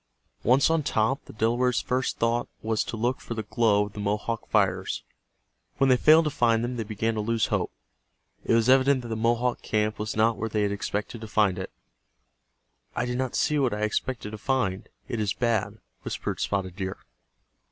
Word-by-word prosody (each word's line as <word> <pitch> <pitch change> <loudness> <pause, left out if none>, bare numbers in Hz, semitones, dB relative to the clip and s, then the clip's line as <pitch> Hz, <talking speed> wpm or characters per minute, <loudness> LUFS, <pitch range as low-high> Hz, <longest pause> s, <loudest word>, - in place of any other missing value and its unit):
Once 135 +5 +4
on 165 -1 +2
top 130 0 0
the - - -12
Delawares' 120 +3 +1
first 130 +1 -1
thought 115 +1 0
was 110 0 +1
to 115 - -6
look 120 +4 -1
for 115 - -6
the 110 - -3
glow 105 -1 +2
of 105 - -11
the - - -8
Mohawk 105 +3 -2
fires. - - +1 0.7
When 135 -1 +4
they - - +7
failed 155 +4 +6
to 150 - 0
find 115 -3 +2
them 120 +1 -2
they 115 - -1
began 110 +1 -1
to 110 - -2
lose 115 +1 +1
hope. - - 0 0.7
It - - +2
was 115 0 +3
evident 130 0 +4
that 120 - -7
the 110 - -2
Mohawk 120 +2 +1
camp 105 0 -1
was 110 0 -3
not 110 0 +3
where 115 +2 -3
they 105 -1 0
had 100 - +1
expected 105 +2 -3
to 110 - -6
find 105 -3 +2
it. 95 - -5 1.3
"I 120 - 0
do 125 0 -2
not 130 0 -2
see 150 -1 +2
what 130 -6 +1
I 105 - -5
expected 105 +1 -2
to 110 - -7
find—it 115 -2 -2
is 105 -3 0
bad," 115 -4 0 0.2
whispered - - -4
Spotted 95 -3 -2
Deer. 95 -1 -3
115 Hz, 195 wpm, -26 LUFS, 105-125 Hz, 1.3 s, they